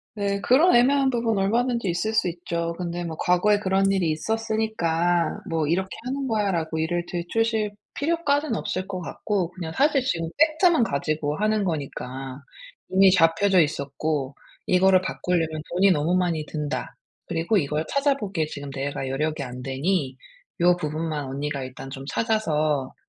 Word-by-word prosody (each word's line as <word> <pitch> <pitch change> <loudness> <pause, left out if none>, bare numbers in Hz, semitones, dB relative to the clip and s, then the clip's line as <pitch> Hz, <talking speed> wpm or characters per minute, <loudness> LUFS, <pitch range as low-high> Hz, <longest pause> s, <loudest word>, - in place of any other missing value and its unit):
네 200 -1 -1
그런 265 - +5
애매한 270 +3 +4
부분 230 -4 0
얼마든지 235 +2 +1
있을 175 +6 -1
수 220 - +2
있죠. 170 -1 -3
근데 175 -1 -3
뭐 165 -2 -5
"과거에 180 +4 +3
그런 195 -1 +2
일이 185 -5 +1
있었으니까 175 -3 0
뭐 160 -2 0
이렇게 190 +4 0 0.2
하는 270 +1 -2
거야."라고 190 -8 0
일을 170 +2 0
들추실 215 +5 0 0.2
필요까지는 290 -4 0
없을 185 -2 -3
것 185 -2 -5
같고 185 0 -2
그냥 170 -2 -6
사실 280 0 +3
지금 165 -9 -1
팩트만 315 0 +4
가지고 150 -3 -1
하는 215 0 +1
거니까 135 -5 -5 0.5
"이미 190 +1 +6
잡혀져 180 +2 +4
있었고 140 -1 -2 0.3
이거를 185 0 +5
바꾸려면 180 -2 -1 0.3
돈이 190 +3 +4
너무 170 0 +2
많이 170 -4 0
든다. 150 -1 -4 0.3
그리고 170 +6 +1
이걸 150 -2 0
찾아보기에 250 - 0
지금 145 -2 -7
내가 135 0 -4
여력이 150 +3 -1
안 125 -1 -6
되니 135 +1 -1 0.5
요 175 +1 +5
부분만 155 -2 -3
언니가 140 +1 -3
일단 130 +1 -8
좀 135 0 -8
찾아서 155 - 0
175 Hz, 340 characters per minute, -24 LUFS, 155-215 Hz, 0.5 s, 이미